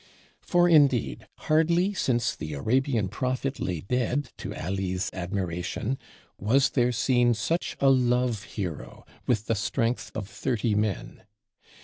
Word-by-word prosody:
For 175 Hz, -1 st, +3 dB
indeed, 145 Hz, -8 st, +3 dB
hardly 170 Hz, +5 st, +2 dB
since 120 Hz, -, 0 dB
the 75 Hz, -1 st, -5 dB
Arabian 115 Hz, -, +1 dB
Prophet 130 Hz, +6 st, -2 dB
lay 90 Hz, -4 st, -2 dB
dead, 125 Hz, -, -1 dB
to -, -, -6 dB
Ali's 95 Hz, +2 st, -2 dB
admiration, 95 Hz, +6 st, -3 dB, 0.4 s
was 135 Hz, +7 st, +3 dB
there 125 Hz, -2 st, +2 dB
seen 120 Hz, 0 st, +2 dB
such 165 Hz, +10 st, -2 dB
a 135 Hz, -1 st, +5 dB
Love 125 Hz, -3 st, +2 dB
hero, 80 Hz, -, -6 dB, 0.2 s
with 110 Hz, -4 st, +1 dB
the 115 Hz, -, +1 dB
strength 115 Hz, +3 st, -1 dB
of 105 Hz, -3 st, -4 dB
thirty 115 Hz, -1 st, -1 dB
men. 105 Hz, -2 st, -2 dB
120 Hz, 125 wpm, -27 LUFS, 100-135 Hz, 0.4 s, a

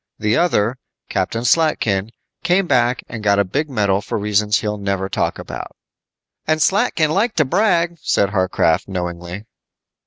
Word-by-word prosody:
The 105 Hz, +1 st, +1 dB
other, 125 Hz, -7 st, +1 dB, 0.3 s
Captain 115 Hz, +1 st, -2 dB
Slatkin, 115 Hz, -9 st, +1 dB, 0.3 s
came 180 Hz, +2 st, +2 dB
back 125 Hz, -5 st, +1 dB
and 115 Hz, -2 st, -7 dB
got 100 Hz, -1 st, +3 dB
a 100 Hz, -, +4 dB
big 145 Hz, +11 st, -2 dB
medal 100 Hz, -6 st, +1 dB
for -, -, -4 dB
reasons 105 Hz, 0 st, +1 dB
he'll 105 Hz, -1 st, -3 dB
never 100 Hz, -1 st, -2 dB
talk -, -, -1 dB
about." -, -, -8 dB, 0.7 s
"And 155 Hz, 0 st, +2 dB
Slatkin 180 Hz, -4 st, +2 dB
liked 210 Hz, +5 st, 0 dB
to 155 Hz, -, +4 dB
brag," 170 Hz, 0 st, +1 dB
said 100 Hz, -8 st, +1 dB
Warcraft, 95 Hz, -3 st, +1 dB
knowingly. 90 Hz, +1 st, -5 dB
110 Hz, 150 wpm, -19 LUFS, 100-155 Hz, 0.7 s, a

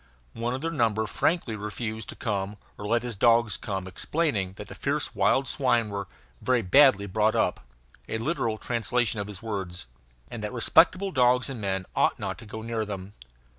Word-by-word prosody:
One 120 Hz, +2 st, -2 dB
of 130 Hz, -, -5 dB
their 165 Hz, +1 st, -1 dB
number 110 Hz, -7 st, +1 dB
frankly 120 Hz, -, 0 dB
refused 110 Hz, 0 st, -5 dB
to -, -, -6 dB
come 100 Hz, -1 st, -3 dB, 0.2 s
or 105 Hz, -, -8 dB
to -, -, -3 dB
let 120 Hz, +1 st, +2 dB
his 120 Hz, -3 st, -4 dB
dogs 115 Hz, 0 st, +4 dB
come, 95 Hz, -2 st, -4 dB
explaining 100 Hz, -, -1 dB
that -, -, -9 dB
the -, -, -9 dB
fierce -, -, -2 dB
wild 135 Hz, 0 st, +2 dB
swine 120 Hz, -5 st, +1 dB
were 100 Hz, -1 st, -4 dB, 0.3 s
"very 125 Hz, -3 st, +2 dB
badly 120 Hz, -1 st, +6 dB
brought 110 Hz, +3 st, +1 dB
up" 90 Hz, -6 st, +1 dB, 0.5 s
(a -, -, -1 dB
literal 115 Hz, -3 st, -1 dB
translation 120 Hz, -1 st, 0 dB
of 100 Hz, -, -3 dB
his 105 Hz, 0 st, -9 dB
words) 95 Hz, -, -4 dB, 0.4 s
and 115 Hz, -3 st, -7 dB
that 105 Hz, -, -3 dB
respectable 180 Hz, -, +4 dB
dogs 125 Hz, -1 st, +3 dB
and 120 Hz, -5 st, -6 dB
men 95 Hz, -1 st, -1 dB
ought -, -, +3 dB
not -, -, -4 dB
to 115 Hz, -, -11 dB
go 110 Hz, +1 st, -7 dB
near 115 Hz, -1 st, -2 dB
them. 100 Hz, -1 st, -6 dB
110 Hz, 190 wpm, -27 LUFS, 100-125 Hz, 0.5 s, badly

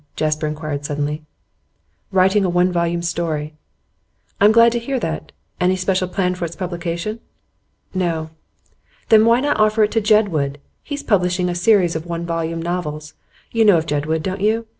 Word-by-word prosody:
Jasper 155 Hz, 0 st, -1 dB
inquired 150 Hz, -1 st, -4 dB
suddenly. 145 Hz, +1 st, -3 dB, 0.9 s
'Writing 190 Hz, +2 st, +3 dB
a 185 Hz, -, +1 dB
one 180 Hz, +1 st, +2 dB
volume 170 Hz, 0 st, -1 dB
story.' 160 Hz, -3 st, -2 dB, 0.9 s
'I'm 205 Hz, +1 st, +6 dB
glad 230 Hz, +1 st, +6 dB
to 235 Hz, -, -1 dB
hear 260 Hz, +3 st, -2 dB
that. 160 Hz, -6 st, -4 dB, 0.3 s
Any 180 Hz, +1 st, +2 dB
special 185 Hz, 0 st, 0 dB
plan 180 Hz, 0 st, 0 dB
for 180 Hz, -, -6 dB
its 170 Hz, 0 st, -4 dB
publication?' 175 Hz, +3 st, -4 dB, 0.7 s
'No.' 165 Hz, -4 st, -2 dB, 0.8 s
'Then 220 Hz, 0 st, +6 dB
why 235 Hz, +2 st, +4 dB
not 290 Hz, -4 st, 0 dB
offer 215 Hz, 0 st, +3 dB
it 210 Hz, -, +1 dB
to 225 Hz, -, +1 dB
Jedwood? 200 Hz, -10 st, +2 dB, 0.3 s
He's 285 Hz, -1 st, -6 dB
publishing 180 Hz, -3 st, +1 dB
a -, -, -1 dB
series 180 Hz, -2 st, +3 dB
of 160 Hz, +2 st, -4 dB
one 170 Hz, 0 st, -4 dB
volume 165 Hz, -1 st, -3 dB
novels. 155 Hz, -3 st, -4 dB, 0.4 s
You 230 Hz, -1 st, +2 dB
know 205 Hz, -5 st, +6 dB
of 160 Hz, -, -1 dB
Jedwood, 155 Hz, +1 st, -1 dB
don't 190 Hz, +1 st, -3 dB
you? 220 Hz, +2 st, +1 dB
180 Hz, 165 wpm, -20 LUFS, 160-210 Hz, 0.9 s, I'm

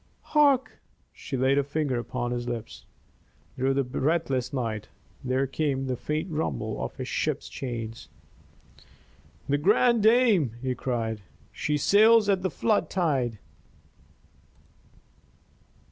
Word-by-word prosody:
"Hark!" 285 Hz, -4 st, +3 dB, 0.3 s
She 135 Hz, -, -5 dB
laid 135 Hz, +2 st, +3 dB
a -, -, +1 dB
finger 140 Hz, -3 st, -1 dB
upon 120 Hz, 0 st, -3 dB
his 120 Hz, 0 st, -3 dB
lips. 115 Hz, -2 st, -6 dB, 0.7 s
Through 135 Hz, +1 st, 0 dB
the 140 Hz, -, +2 dB
breathless 135 Hz, 0 st, -1 dB
night 115 Hz, -6 st, -3 dB, 0.4 s
there 130 Hz, +1 st, +1 dB
came 135 Hz, -1 st, -1 dB
the 130 Hz, -1 st, -1 dB
faint 155 Hz, +7 st, -3 dB
rumble 150 Hz, -, -2 dB
of -, -, -6 dB
a -, -, -3 dB
ship's -, -, -2 dB
chains. 115 Hz, -3 st, -6 dB, 1.4 s
"The 145 Hz, +1 st, +1 dB
Grande 220 Hz, +7 st, +4 dB
Dame!" 220 Hz, -, +4 dB
he 130 Hz, 0 st, -2 dB
cried. 115 Hz, -4 st, -3 dB, 0.3 s
"She 150 Hz, -1 st, -1 dB
sails 215 Hz, +6 st, +5 dB
at 195 Hz, -2 st, +2 dB
the 185 Hz, -, 0 dB
flood 215 Hz, +5 st, 0 dB
tide." 135 Hz, -, 0 dB
135 Hz, 120 wpm, -27 LUFS, 125-180 Hz, 1.4 s, sails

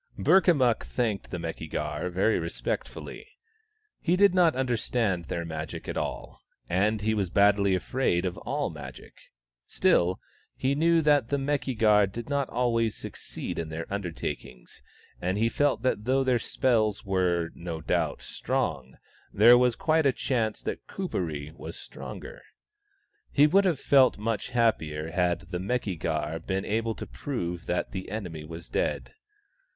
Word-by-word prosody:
Burkamukk 145 Hz, -11 st, +4 dB
thanked 110 Hz, -6 st, -2 dB
the 90 Hz, -, -4 dB
Meki 80 Hz, -1 st, -5 dB
gar 75 Hz, +4 st, -3 dB
very 95 Hz, +5 st, +2 dB
respect 85 Hz, 0 st, -3 dB
fully. -, -, -9 dB, 0.8 s
He 175 Hz, +1 st, +2 dB
did 200 Hz, 0 st, +5 dB
not 175 Hz, -3 st, +4 dB
understand 115 Hz, -7 st, 0 dB
their 85 Hz, +2 st, -3 dB
Magic 80 Hz, -1 st, -6 dB
at -, -, -3 dB
all, -, -, -4 dB, 0.3 s
and 105 Hz, +4 st, +1 dB
he 110 Hz, +1 st, +1 dB
was 100 Hz, -4 st, 0 dB
badly 100 Hz, 0 st, +4 dB
afraid 95 Hz, -2 st, 0 dB
of 90 Hz, -, -2 dB
all -, -, -2 dB
Magic; -, -, -10 dB, 0.5 s
still, 90 Hz, +2 st, +2 dB, 0.4 s
he 130 Hz, +1 st, 0 dB
knew 165 Hz, +2 st, +3 dB
that 145 Hz, -5 st, +3 dB
the 140 Hz, -, +1 dB
Meki 135 Hz, -3 st, -1 dB
gar 105 Hz, -2 st, +5 dB
did 115 Hz, +6 st, -7 dB
not 140 Hz, -2 st, 0 dB
always 115 Hz, -2 st, +1 dB
succeed -, -, -6 dB
in 80 Hz, -1 st, -4 dB
their 80 Hz, +1 st, -4 dB
undertakings, 85 Hz, -9 st, -5 dB, 0.4 s
and 95 Hz, +2 st, 0 dB
he 115 Hz, +2 st, +2 dB
felt 145 Hz, -2 st, +1 dB
that 105 Hz, -5 st, 0 dB
though 135 Hz, +2 st, +2 dB
their 130 Hz, -2 st, +2 dB
spells 110 Hz, -4 st, +1 dB
were, 90 Hz, -3 st, +1 dB
no 85 Hz, -2 st, -6 dB
doubt, -, -, -1 dB
strong, 65 Hz, 0 st, -2 dB, 0.3 s
there 115 Hz, +4 st, +7 dB
was 125 Hz, -1 st, +3 dB
quite 155 Hz, -2 st, +2 dB
a -, -, +5 dB
chance 115 Hz, -4 st, -1 dB
that -, -, -5 dB
Kuperee 80 Hz, -, -4 dB
was 85 Hz, -, -9 dB
stronger. -, -, -9 dB, 0.9 s
He 145 Hz, -, +5 dB
would 195 Hz, +6 st, +4 dB
have 170 Hz, -7 st, +1 dB
felt 135 Hz, -3 st, +5 dB
much 110 Hz, 0 st, -2 dB
happier 80 Hz, -11 st, 0 dB
had 90 Hz, 0 st, +1 dB
the 90 Hz, -, -2 dB
Meki 100 Hz, -3 st, -2 dB
gar 80 Hz, 0 st, -2 dB
been 95 Hz, +4 st, -3 dB
able 110 Hz, +1 st, -1 dB
to -, -, -6 dB
prove 90 Hz, -11 st, -4 dB
that 90 Hz, -, -1 dB
the 95 Hz, -1 st, -6 dB
enemy 90 Hz, -7 st, -5 dB
was 80 Hz, +2 st, -9 dB
dead. -, -, -2 dB
105 Hz, 155 wpm, -27 LUFS, 85-130 Hz, 0.9 s, there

